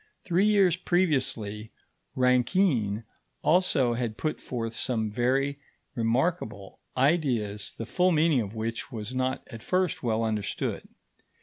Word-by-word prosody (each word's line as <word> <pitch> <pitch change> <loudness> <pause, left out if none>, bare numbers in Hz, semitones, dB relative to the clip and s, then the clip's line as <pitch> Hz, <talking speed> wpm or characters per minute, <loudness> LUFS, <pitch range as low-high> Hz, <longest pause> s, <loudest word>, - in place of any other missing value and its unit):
Three 185 +3 +2
years 195 -5 +4
previously, 130 - 0 0.4
Rankine 125 - +2 0.4
also 150 -7 +3
had 115 -2 -3
put 155 -1 -2
forth 115 -2 -4
some 110 -4 0
very 135 +5 0 0.3
remarkable 115 - -1 0.2
ideas 125 - +1
the 115 - -4
full 180 +9 +2
meaning 155 -5 +3
of 105 0 -6
which 115 +4 -4
was 110 0 -5
not 130 +1 -2
at 115 - -8
first 185 +2 0
well 115 -2 0
understood. 110 -2 -2
125 Hz, 120 wpm, -27 LUFS, 110-160 Hz, 0.4 s, years